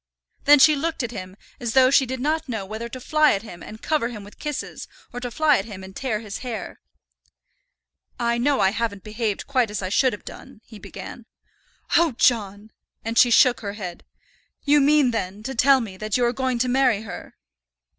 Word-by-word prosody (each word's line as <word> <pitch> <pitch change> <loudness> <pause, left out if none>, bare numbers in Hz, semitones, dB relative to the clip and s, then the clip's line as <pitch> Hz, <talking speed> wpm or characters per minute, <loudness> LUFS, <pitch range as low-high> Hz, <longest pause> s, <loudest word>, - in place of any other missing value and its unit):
Then 290 +1 +8
she 305 +2 +6
looked 320 0 -2
at 240 - -4
him 185 -4 -8 0.2
as 240 -2 -3
though 260 -1 +5
she 275 -1 +4
did 260 +1 -4
not 310 +2 -1
know 220 -5 -3
whether 220 +4 -6
to 255 - -8
fly 305 +4 +3
at 200 - -3
him 175 -7 -11
and 220 +1 -11
cover 305 -7 0
him 225 -4 -8
with 205 - -15
kisses, 295 -2 -5 0.3
or 245 - -4
to 245 0 -4
fly 295 +3 +3
at 195 - -5
him 200 -4 -9
and 190 0 -11
tear 230 -6 -2
his 210 -2 -7
hair. 240 -4 -6 1.4
"I 235 0 0
know 280 +3 +2
I 190 0 +4
haven't 220 -3 -3
behaved 215 -1 -3
quite 255 -5 +1
as 210 -1 -4
I 185 - -2
should 255 +6 +3
have 205 - -9
done," 215 - -12
he 220 -2 -13
began. - - -10 0.7
"Oh, 335 -4 +4
John!" 215 -3 +1 0.3
and 225 0 -3
she 240 +1 +6
shook 245 +1 +5
her 200 -2 -5
head. 185 -5 -7 0.6
"You 290 0 +4
mean, 285 -2 +4
then, 205 -2 -4
to 265 - -4
tell 265 +2 +4
me 200 -5 -7
that 215 +2 -1
you 245 - +2
are 240 - +1
going 260 -1 -1
to 250 +2 0
marry 250 -4 +2
her?" 220 - -9
235 Hz, 210 wpm, -23 LUFS, 210-265 Hz, 1.4 s, Then